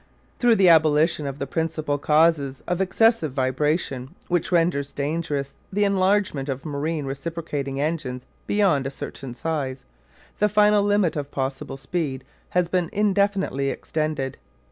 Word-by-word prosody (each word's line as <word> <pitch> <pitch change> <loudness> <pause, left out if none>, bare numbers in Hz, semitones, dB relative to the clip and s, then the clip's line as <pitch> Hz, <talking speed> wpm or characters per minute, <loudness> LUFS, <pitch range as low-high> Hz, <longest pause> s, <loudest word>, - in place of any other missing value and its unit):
Through 240 -2 +5
the 195 -3 +4
abolition 155 -1 +4
of 135 0 -5
the 140 - -3
principal 155 -1 -2
causes 150 -3 +2
of 180 +1 0
excessive 190 - +2
vibration 135 +1 -1
which 175 0 0
renders 165 -5 +1
dangerous 145 -1 -2 0.2
the 205 +2 +1
enlargement 190 -7 +1
of 135 +2 -4
marine 150 +1 -2
reciprocating 140 -1 -4
engines 140 -5 -2 0.2
beyond 180 -10 +2
a - - -2
certain 135 -2 -7
size 140 -4 -3 0.6
the 210 - +3
final 210 0 +4
limit 205 -4 +2
of 145 -2 -3
possible 135 0 -4
speed 135 -3 -3 0.3
has 180 -1 +1
been 175 -1 0
indefinitely 200 -8 +1
extended. 155 -3 -3
155 Hz, 135 wpm, -24 LUFS, 140-180 Hz, 0.6 s, Through